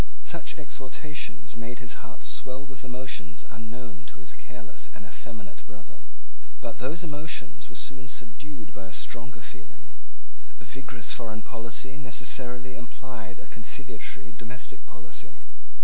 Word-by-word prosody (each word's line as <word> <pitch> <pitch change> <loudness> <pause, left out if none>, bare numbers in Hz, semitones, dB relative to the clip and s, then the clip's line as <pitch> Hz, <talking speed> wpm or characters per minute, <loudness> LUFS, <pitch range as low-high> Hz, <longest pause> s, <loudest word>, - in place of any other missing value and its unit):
Such - - +3
exhortations 145 +2 +1
made 115 +1 0
his 120 -3 -1
heart - - -6
swell 130 +1 +4
with 135 -2 -6
emotions 125 - +1
unknown 110 -7 -3
to - - -10
his 90 0 -3
careless 120 -5 -4
and 105 - -5
effeminate 110 0 -4
brother. 105 -1 -9 0.6
But - - 0
those 155 +8 +4
emotions 150 0 +2
were - - -7
soon 130 -1 +3
subdued 125 0 0
by 95 -1 -2
a - - -6
stronger 120 +4 +1
feeling. 80 - -7 0.7
A 110 - -7
vigorous 125 0 +1
foreign 110 -3 +1
policy 125 +4 0
necessarily 125 0 +3
implied 120 -5 -3
a - - -7
conciliatory 110 -2 0
domestic 120 +3 -2
policy. 95 -1 -5
120 Hz, 135 wpm, -36 LUFS, 105-130 Hz, 0.7 s, swell